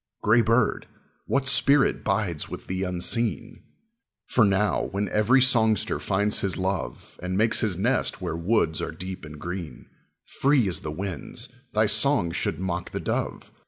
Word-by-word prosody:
Gray 110 +3 +5
bird, 115 +1 +1 0.4
what 140 -1 +1
spirit 140 +1 +4
bides 95 -6 -1
with - - -8
thee 95 0 -3
unseen? 90 +1 -1 0.6
For 125 - +2
now, 100 -1 +1
when 100 +1 -3
every 120 +5 +4
songster 110 -5 +2
finds 105 +2 +1
his 95 -2 -1
love 95 -9 -4
And 90 +1 -3
makes 110 +2 +3
his 100 -6 0
nest 120 +4 0
where 90 -3 -4
woods 85 -2 0
are - - -3
deep 95 0 -8
and 75 0 -10
green, 85 -5 -7 0.4
Free 135 -5 +2
as 90 -4 -2
the 75 - -6
winds, 100 - -4 0.2
thy 110 +1 +3
song 130 -6 +2
should - - -2
mock 90 -1 -3
the - - -4
dove. - - -3
100 Hz, 160 wpm, -25 LUFS, 90-115 Hz, 0.6 s, Gray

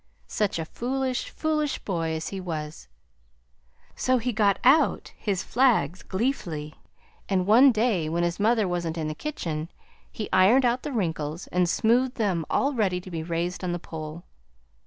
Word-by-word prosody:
Such 210 -4 -1
a 165 - -3
foolish, 255 +6 -2
foolish 305 -2 -1
boy 165 -4 -2
as 160 0 -3
he 195 -1 -5
was! 155 - -6 1.1
"So 255 0 +2
he 245 +1 -2
got 205 -2 +3
out 275 +6 +3
his 195 -4 -2
flags 240 -8 +2
gleefully, 175 - -3 0.6
and 185 -2 +1
one 245 +7 +7
day, 215 -8 +1
when 170 +2 0
his 175 +2 -1
mother 220 -1 +3
wasn't 170 -2 -2
in 155 -1 -2
the 155 - -3
kitchen, 165 - -4 0.4
he 215 - -5
ironed 205 +8 +5
out 245 +1 +1
the 295 - -5
wrinkles 165 - -2
and 180 -1 +2
smoothed 245 +6 +2
them 185 -8 -1
all 280 +2 +1
ready 195 -7 +1
to 185 +1 -11
be 165 -2 -3
raised 170 +3 -3
on 180 -1 -1
the - - -1
pole. 160 0 -8
190 Hz, 165 wpm, -26 LUFS, 165-240 Hz, 1.1 s, one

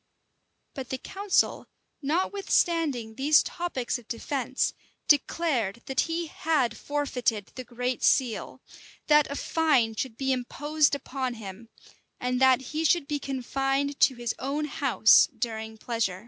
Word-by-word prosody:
But 260 -2 -7
the 260 - -2
council, 395 +8 0 0.3
notwithstanding 330 - 0
these 285 +6 +4
topics 270 -9 -3
of 230 - -18
defence, 260 +2 -2 0.3
declared 265 - +1
that 265 - -2
he 335 +1 -1
had 305 -5 0
forfeited 250 -8 -2
the 255 - -7
great 250 +1 -3
seal; 250 -5 +1 0.4
that 300 -1 +4
a 280 - -4
fine 285 -9 +2
should 230 0 -4
be 270 -1 0
imposed 290 +4 +1
upon 260 -2 -4
him; 220 +1 -10 0.5
and 250 +1 -1
that 260 -1 +5
he 315 +1 -1
should 320 -1 +2
be 290 0 -2
confined 270 +1 -2
to 260 - +4
his 240 -1 -3
own 285 +3 -2
house 270 -6 +4
during 220 -1 -4
pleasure. 220 -5 -2
265 Hz, 135 wpm, -27 LUFS, 240-295 Hz, 0.5 s, that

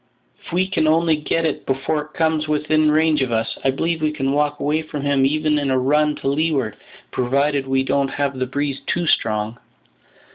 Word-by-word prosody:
If - - -11
we 185 +2 +1
can 160 -5 0
only 160 +1 +3
get 160 +2 -1
it 155 - -2
before 150 +3 -1
he - - -19
comes 160 -1 +1
within 155 +1 +2
range 155 -1 +3
of 130 -2 -1
us, 115 0 -1
I 135 - +3
believe 165 +4 -1
we 155 -1 +1
can 135 -3 -1
walk 145 +1 0
away 150 +2 0
from 150 -2 -6
him 140 -2 +3
even 155 +1 +1
in 140 -1 -1
a 130 - +2
run 150 +3 +2
to - - -5
leeward, 140 -6 0 0.4
provided 140 +2 0
we 135 0 +1
don't 140 +1 +1
have 140 -1 -2
the 130 - -1
breeze 140 +1 -3
too 175 0 0
strong." 110 -4 0
145 Hz, 205 wpm, -21 LUFS, 135-155 Hz, 0.4 s, only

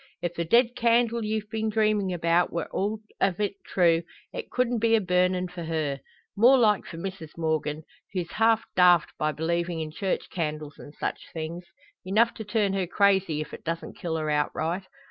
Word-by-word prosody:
If 175 0 -1
the 170 -1 -2
dead 240 +6 +4
candle 235 -1 +2
ye've 215 0 -2
been 220 -1 -1
dreamin' 215 -3 +1
about 170 0 +2
we're 170 -1 -2
all 210 +2 -1 0.2
o' 195 -2 +3
it 200 -2 -3
true, 170 -3 +3 0.3
it - - -6
couldn't 245 -2 0
be 225 +1 +4
a - - +4
burnin' 180 -1 +1
for 175 -1 -7
her. 155 -4 -2 0.4
More 245 +6 +6
like 215 -5 +3
for 165 - -8
Mrs 170 -3 -7
Morgan, 155 -1 -1 0.3
who's 180 -3 -3
half 225 0 +3
daft 180 -3 +5
by 155 0 +1
believing 170 +2 -1
in 155 -1 -4
church 190 +4 -2
candles 155 -4 -4
and 145 - -11
such - - -4
things 165 +2 -5 0.4
enough 215 +5 +3
to 220 - -7
turn 210 -2 0
her 190 -2 -1
crazy, 190 -5 +2
if 155 - -8
it - - -9
doesn't 165 0 -4
kill 165 -2 -3
her 155 -1 -1
outright. 160 +5 -1
180 Hz, 185 wpm, -27 LUFS, 165-215 Hz, 0.4 s, More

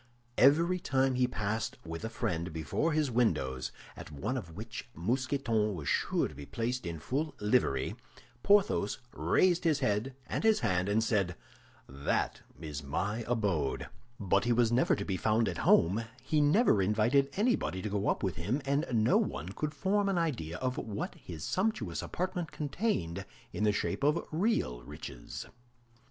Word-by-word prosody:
Every 165 +7 +5
time 135 -4 +1
he 125 0 +2
passed 110 0 -2
with 80 +2 -6
a 110 - -2
friend 85 -6 -2
before 80 - -1
his 150 -4 +1
windows, 65 - 0 0.2
at - - -9
one 75 - -3
of 85 -11 -6
which 110 +4 -7
Mousqueton 115 - 0
was 75 -4 -6
sure - - +1
to - - -12
be 70 0 -9
placed 120 -2 -2
in 85 -1 -4
full 145 - -2
livery, 105 - +1 0.5
Porthos 195 - +3 0.2
raised 180 -2 +3
his 160 -4 +3
head 115 +2 0
and - - -3
his 220 -1 +4
hand, 90 0 +1
and 110 +2 +2
said, 100 -6 +1 0.5
"That 70 +1 -1 0.2
is 75 -3 -5
my 100 +11 -2
abode!" 100 - 0 0.3
But 100 0 +2
he 120 - +2
was 115 -1 +3
never 125 +2 +3
to 100 - -4
be 95 -2 -1
found 110 +3 +2
at 85 - -3
home; 100 +8 +4 0.2
he 155 -1 +2
never 150 - +4
invited 110 +8 +3
anybody 210 - +1
to 105 - -2
go 100 0 -1
up - - 0
with 95 -5 -1
him, 105 - -1
and 140 +4 +1
no 110 -2 +4
one 70 +8 -2
could 150 +10 -4
form 200 +6 +1
an 195 - +1
idea 115 - -1
of 130 +3 -2
what 105 -2 -4
his 80 -4 -9
sumptuous 215 +4 -1
apartment 180 -3 -3
contained 145 - -2 0.3
in 105 - 0
the 105 - +4
shape 105 - -2
of 150 +3 +2
real 155 - 0
riches. - - -8
110 Hz, 170 wpm, -31 LUFS, 90-145 Hz, 0.5 s, Every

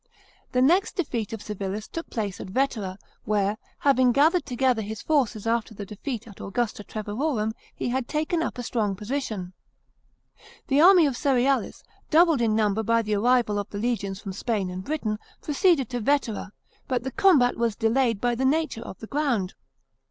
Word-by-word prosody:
The 250 0 +3
next 355 +8 +3
defeat 240 - -2
of 225 -2 -6
Civilis 205 0 -4
took 330 - -6
place 205 -5 -3
at - - -7
Vetera, 215 -5 -1 0.3
where, 205 0 0 0.2
having 260 -3 +4
gathered 310 +6 +3
together 250 -2 +1
his 215 0 -6
forces 250 -9 +1
after 230 -1 -1
the 205 - -6
defeat 225 +3 -6
at 205 - -12
Augusta 215 +1 -2
Treverorum, 215 +2 -2 0.2
he - - -2
had 250 0 -1
taken 315 +2 0
up - - -3
a 245 - -4
strong 215 -4 -1
position. 210 -4 -4 1.2
The 280 +2 +4
army 360 -1 +8
of 280 - +1
Cerealis, 270 0 +1 0.3
doubled 325 -4 +5
in 220 -2 +2
number 215 -1 +2
by 230 +1 +2
the 215 0 -2
arrival 225 -1 +2
of 205 - -5
the 205 - -6
legions 205 -4 -2
from 195 -2 -6
Spain 205 -2 -2
and 185 +1 -5
Britain, 220 -8 -2 0.2
proceeded 300 - +2
to 245 - -2
Vetera; 230 -5 0 0.4
but 250 -3 -1
the 265 - -4
combat 280 -8 +4
was 230 -2 0
delayed 230 0 +1
by 245 +2 +1
the 245 +3 -2
nature 285 -3 +1
of 190 - -8
the - - -6
ground. 245 -11 0
235 Hz, 175 wpm, -25 LUFS, 210-275 Hz, 1.2 s, army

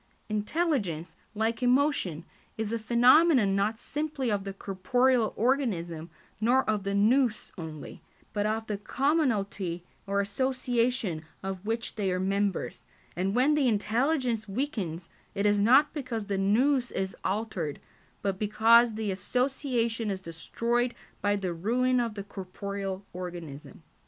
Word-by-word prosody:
Intelligence, 210 - -1 0.2
like 225 +2 0
emotion, 250 - +1 0.3
is 220 0 -2
a 230 - -1
phenomenon 240 0 +5
not 210 +3 +1
simply 290 -1 -3
of 200 -1 -1
the 195 - -3
corporeal 220 +6 +1
organism 185 - 0 0.3
nor 245 +4 +3
of 215 -1 +1
the 200 0 -1
[Greek: 200 - +3
Nous] 240 -1 +2
only, 160 -4 -8 0.3
but 205 0 0
of 220 +1 -1
the 210 -2 -3
commonalty 210 - 0 0.2
or 200 0 +1
association 240 -4 0 0.2
of 195 +1 -5
which 230 +1 -2
they 195 -3 0
are 180 - 0
members, 195 0 -1 0.3
and 190 +3 -1
when 265 +5 +4
the 295 -3 +3
intelligence 235 +1 0
weakens 195 - -3 0.2
it 200 0 0
is 205 0 +4
not 265 +8 +5
because 250 -7 -4
the 200 -1 -2
[Greek: 195 0 +1
Nous] 255 +3 +3
is 190 0 -3
altered, 190 -7 -2 0.4
but 195 -2 -1
because 225 +2 +5
the 215 -2 -2
association 235 +1 -1
is 190 -1 -4
destroyed 235 +9 -1 0.3
by 205 0 +2
the 190 -3 -2
ruin 245 +8 +1
of 230 -3 -1
the 200 - -5
corporeal 195 0 -5
organism. 170 -5 -8
215 Hz, 140 wpm, -28 LUFS, 195-250 Hz, 0.4 s, phenomenon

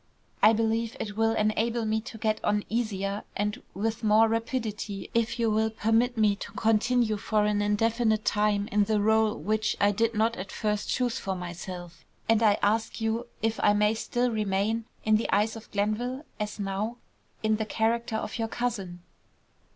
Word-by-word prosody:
I 215 - +8
believe 225 +1 0
it 205 -1 -4
will 225 +1 +2
enable 225 +2 0
me 220 0 0
to 225 0 -9
get 215 0 -1
on 210 0 +1
easier 205 -3 -2
and 210 +4 -2
with 220 +4 -2
more 215 +1 +5
rapidity 225 -3 -3
if 230 0 +1
you 230 -2 +1
will 220 +1 +2
permit 225 +3 +1
me 210 -2 +3
to - - -7
continue 225 0 +2
for 210 0 +1
an 210 0 +1
indefinite 220 +1 +1
time 210 -1 +1
in 210 -3 +2
the 215 +1 0
rôle 220 +1 +3
which 215 0 0
I 205 0 +4
did 225 +2 0
not 225 +2 +1
at 190 +1 -6
first 210 -1 -2
choose 245 -2 0
for 190 -1 -3
myself, 175 -1 -7 0.2
and 225 0 +3
I 210 -2 +4
ask 220 +3 +1
you 225 +2 -1 0.2
if 225 0 0
I 205 - +5
may 210 +1 +3
still 240 +2 -1
remain, 215 +1 0 0.2
in 215 0 +5
the 225 - -2
eyes 210 +3 +2
of 225 - -11
Glenville, 235 +7 -1
as 210 0 -3
now, 205 +4 -2 0.5
in 215 0 +2
the 220 - -2
character 225 +1 0
of 220 - -3
your 225 - 0
cousin." 200 -8 -3
220 Hz, 180 wpm, -28 LUFS, 210-225 Hz, 0.5 s, I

